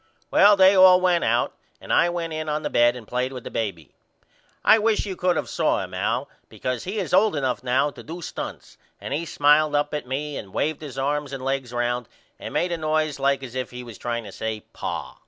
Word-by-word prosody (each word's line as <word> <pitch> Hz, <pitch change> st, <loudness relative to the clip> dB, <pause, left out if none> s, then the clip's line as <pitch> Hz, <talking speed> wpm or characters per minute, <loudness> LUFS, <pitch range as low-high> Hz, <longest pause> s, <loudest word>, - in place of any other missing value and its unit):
Well 205 Hz, +1 st, +7 dB
they 190 Hz, 0 st, +6 dB
all 185 Hz, -1 st, +8 dB
went 180 Hz, -2 st, +2 dB
out 120 Hz, +2 st, +1 dB, 0.3 s
and -, -, -4 dB
I 175 Hz, -, +4 dB
went 170 Hz, -2 st, -3 dB
in 155 Hz, 0 st, -3 dB
on 150 Hz, +1 st, -2 dB
the 150 Hz, -, -3 dB
bed 120 Hz, +1 st, +4 dB
and 120 Hz, -4 st, -10 dB
played 125 Hz, +1 st, -1 dB
with 125 Hz, -3 st, -8 dB
the -, -, -8 dB
baby. 100 Hz, -8 st, -4 dB, 0.7 s
I 220 Hz, -, +7 dB
wish 215 Hz, 0 st, +1 dB
you 195 Hz, -2 st, -4 dB
could 180 Hz, 0 st, +1 dB
of -, -, -2 dB
saw -, -, 0 dB
him -, -, -9 dB
Al -, -, -1 dB, 0.2 s
because 125 Hz, -2 st, -4 dB
he 195 Hz, +4 st, -4 dB
is 195 Hz, -3 st, -3 dB
old 200 Hz, 0 st, +4 dB
enough 130 Hz, -3 st, -1 dB
now 130 Hz, +3 st, +1 dB
to -, -, -12 dB
do 165 Hz, +3 st, -8 dB
stunts -, -, -7 dB, 0.2 s
and -, -, -5 dB
he 160 Hz, +4 st, -2 dB
smiled 150 Hz, 0 st, +3 dB
up 145 Hz, 0 st, 0 dB
at 150 Hz, -4 st, -4 dB
me 145 Hz, +3 st, -3 dB
and 95 Hz, -, -9 dB
waved 155 Hz, 0 st, -1 dB
his 140 Hz, -4 st, -8 dB
arms 145 Hz, +1 st, -1 dB
and 135 Hz, -1 st, -6 dB
legs 135 Hz, -2 st, -2 dB
round 120 Hz, -1 st, -2 dB, 0.3 s
and -, -, -7 dB
made 175 Hz, -, 0 dB
a 170 Hz, -, -1 dB
noise 155 Hz, -2 st, 0 dB
like 135 Hz, 0 st, +1 dB
as 125 Hz, -3 st, -8 dB
if 130 Hz, -2 st, -3 dB
he 125 Hz, 0 st, -8 dB
was 115 Hz, -4 st, -11 dB
trying 120 Hz, -1 st, -3 dB
to 100 Hz, -, -9 dB
say 110 Hz, +1 st, -4 dB
Pa. -, -, -5 dB
145 Hz, 235 wpm, -24 LUFS, 125-170 Hz, 0.7 s, all